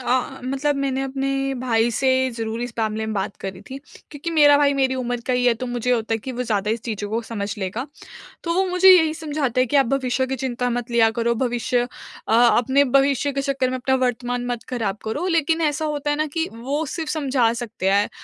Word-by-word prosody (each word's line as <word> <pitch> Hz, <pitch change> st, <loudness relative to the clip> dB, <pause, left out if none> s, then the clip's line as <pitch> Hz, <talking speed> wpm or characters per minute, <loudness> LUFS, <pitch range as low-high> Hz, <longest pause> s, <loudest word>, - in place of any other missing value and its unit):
अ -, -, -10 dB, 0.3 s
अ, -, -, -16 dB
मतलब 275 Hz, +3 st, 0 dB
मैंने 270 Hz, -1 st, -1 dB
अपने 270 Hz, 0 st, -2 dB, 0.3 s
भाई 235 Hz, -2 st, +2 dB
से 260 Hz, +3 st, 0 dB, 0.2 s
ज़रूर 225 Hz, -1 st, -4 dB
इस 245 Hz, 0 st, -5 dB
मामले 220 Hz, 0 st, -1 dB
में 220 Hz, -, -3 dB
बात 195 Hz, -1 st, -3 dB
करी 190 Hz, -1 st, -6 dB
थी। 265 Hz, -, -6 dB, 0.3 s
क्योंकि 295 Hz, +3 st, -5 dB
मेरा 295 Hz, -3 st, +6 dB
भाई 285 Hz, -1 st, +3 dB
मेरी 265 Hz, -1 st, +1 dB
उम्र 245 Hz, -2 st, -2 dB
का 255 Hz, -, +1 dB
ही 250 Hz, 0 st, +1 dB
है 240 Hz, -, +4 dB
तो -, -, -1 dB
मुझे 245 Hz, 0 st, -2 dB
ये -, -, +5 dB
होता 225 Hz, 0 st, -2 dB
है -, -, -1 dB
कि 260 Hz, +4 st, -6 dB
वो 250 Hz, 0 st, -3 dB
ज़्यादा 210 Hz, -3 st, -1 dB
इस 225 Hz, +1 st, -1 dB
चीज़ों 210 Hz, -3 st, -4 dB
को 225 Hz, +2 st, 0 dB
समझ 210 Hz, -3 st, -4 dB
लेगा। 205 Hz, +7 st, -3 dB, 0.6 s
तो 335 Hz, -, 0 dB
वो 380 Hz, +2 st, +2 dB
मुझे 365 Hz, +1 st, +5 dB
यही 320 Hz, -4 st, +6 dB
समझाता 295 Hz, -6 st, -1 dB
है 255 Hz, -, +3 dB
कि 285 Hz, -, 0 dB
आप 275 Hz, -2 st, +4 dB
भविष्य 260 Hz, 0 st, 0 dB
की 265 Hz, +1 st, -3 dB
चिंता 250 Hz, -1 st, -2 dB
मत 245 Hz, 0 st, -3 dB
लिया 230 Hz, -2 st, +4 dB
करो। 235 Hz, +1 st, 0 dB
भविष्य 245 Hz, 0 st, 0 dB, 0.5 s
अ, -, -, +1 dB
अपने 245 Hz, +4 st, +4 dB
भविष्य 275 Hz, +1 st, +2 dB
के 275 Hz, -, -1 dB
चक्कर 270 Hz, -2 st, 0 dB
में 255 Hz, -, -2 dB
अपना 265 Hz, +1 st, 0 dB
वर्तमान 245 Hz, 0 st, -2 dB
मत 240 Hz, -2 st, -4 dB
ख़राब 225 Hz, -6 st, -2 dB
करो। 255 Hz, +11 st, -2 dB
लेकिन 330 Hz, -1 st, +1 dB
ऐसा 300 Hz, 0 st, 0 dB
होता 295 Hz, -1 st, -2 dB
है 290 Hz, -, +1 dB
ना 310 Hz, +1 st, 0 dB
कि 325 Hz, +1 st, 0 dB
वो 275 Hz, +7 st, -2 dB
सिर्फ़ 320 Hz, -3 st, -3 dB
समझा 265 Hz, -7 st, +1 dB
सकते 215 Hz, -5 st, -2 dB
हैं 200 Hz, +1 st, +3 dB
255 Hz, 235 wpm, -22 LUFS, 230-280 Hz, 0.6 s, मेरा